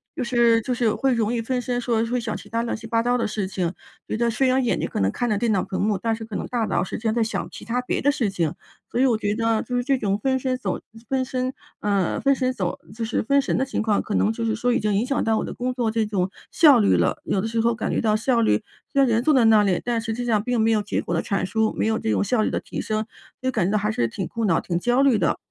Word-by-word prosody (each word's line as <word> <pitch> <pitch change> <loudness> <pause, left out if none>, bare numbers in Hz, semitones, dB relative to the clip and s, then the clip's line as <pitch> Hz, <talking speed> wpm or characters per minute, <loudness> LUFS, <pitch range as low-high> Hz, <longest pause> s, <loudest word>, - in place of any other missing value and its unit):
就 260 - -2
是 235 -1 +3
就 250 +3 -2
是 240 - -2
有 215 - +2
会 270 -2 +2
容 225 -1 0
易 235 - 0
分神， 245 0 -2
说 230 -2 0
会 245 +2 -1
想 225 -2 -3
其 205 +3 -10
它 230 +1 -1
乱 235 - -2
七 225 0 -9
八 230 0 +1
糟 245 +1 +2
的 235 - 0
事 210 -2 -2
情。 185 -2 -2 0.3
觉 - - -2
得 235 0 +1
虽 265 +4 +1
然 255 0 +2
眼 - - +1
睛 - - -2
可 - - -3
能 95 0 +2
看 240 - -2
着 210 - +1
电 230 0 +1
脑 195 - +1
屏 190 - -4
幕， 210 -1 +1
但 225 +3 -1
是 225 - -8
可 220 -2 -8
能 - - -3
大 235 -3 -1
脑 175 - 0
实 190 - -5
际 225 - -12
上 220 -1 +1
在 235 -1 +2
想 220 - -3
其 - - -10
它 245 +2 -1
别 250 - -2
的 285 - +3
事 235 -7 0
情。 170 -4 -1 0.4
所 245 - -1
以 265 - +5
我 245 -4 +3
觉 205 -1 -1
得， 225 -1 +1
就 250 0 -3
是 245 - 0
这 270 +1 +2
种 200 0 0
分 260 +4 0
身 255 0 -1
走 - - -3 0.3
分 265 -1 0
身 255 0 -2 0.3
呃， 200 -4 0
分 275 - +4
神 255 -1 0
走 190 -8 -3
就 225 +1 -3
是 225 - -1
分 280 +5 +3
神 - - -1
的 265 - +1
情 270 - -2
况， 215 -2 +2
可 210 - -3
能 215 - +2
就 230 0 -4
是 225 -1 0
说 245 +1 +1
已 - - +2
经 210 -1 0
影 215 - +1
响 275 +2 0
到 225 -1 +2
我 - - -1
的 - - -6
工 250 +1 -2
作 235 -3 0
这 225 -1 +1
种 190 -3 0 0.2
效 290 -7 +6
率 205 - +4
了。 - - 0
有 195 - 0
的 205 - -1
时 225 0 0
候 235 +1 +2
感 - - -3
觉 - - 0
到 215 -2 +2
效 235 +1 +2
率 105 - +2 0.3
虽 275 - +1
然 270 - +4
人 230 +1 +2
坐 310 - +3
在 250 -4 +4
那 220 -1 +6
里， 190 -3 +1
但 235 -2 0
实 225 - -4
际 245 +2 -4
上 220 -4 +2
并 245 -1 0
没 225 +1 +3
有 215 -1 +2
结 205 - -2
果 175 - -3
的 165 - +1
产 195 -2 -1
出， 220 +3 +1
没 - - +1
有 220 0 +1
这 220 - -2
种 - - +2
效 220 +2 +1
率 - - +1
的 - - -1
提 - - -6
升， 215 0 -2 0.4
就 260 0 0
感 215 -7 0
觉 200 - 0
到 215 - +2
还 210 +1 0
是 120 - 0
挺 180 - -4
苦 230 -1 -4
恼、 170 -5 +3
挺 170 -2 -2
焦 245 +6 +2
虑 265 -5 +4
的。 - - +1
225 Hz, 345 characters per minute, -23 LUFS, 210-245 Hz, 0.4 s, 效